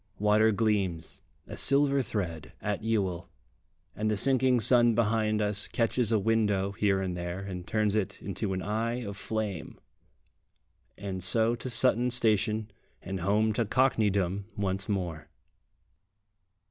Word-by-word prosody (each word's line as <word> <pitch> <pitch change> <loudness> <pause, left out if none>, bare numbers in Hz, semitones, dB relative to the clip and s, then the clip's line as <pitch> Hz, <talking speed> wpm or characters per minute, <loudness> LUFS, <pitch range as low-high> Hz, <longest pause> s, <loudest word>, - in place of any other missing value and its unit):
Water 105 +2 +3
gleams 100 -6 -1 0.2
a - - -8
silver 140 0 +2
thread 90 - -5
at 105 -1 -3
Ewell, 100 -6 -2 0.7
and 110 +1 -1
the 105 - 0
sinking 130 +1 +3
sun 120 +1 +5
behind 110 -1 +1
us 105 0 0
catches 115 0 0
a 110 - +4
window 105 -2 +1
here 100 -1 +1
and 90 -2 -3
there, 85 0 -4
and 95 -2 -7
turns 105 -2 0
it 105 -3 -2
into 95 - -4
an 95 - -3
eye 115 +4 -2
of 100 -2 -6
flame. 105 -5 -4 1.2
And 95 -2 -5
so 110 +5 +3
to 120 +2 -5
Sutton 125 0 +3
station 110 -2 +1 0.3
and 95 +1 -4
home 105 +4 +1
to 115 - 0
Cockneydom 100 -5 +1
once 95 0 -2
more. 85 -6 -3
105 Hz, 135 wpm, -28 LUFS, 95-115 Hz, 1.2 s, sun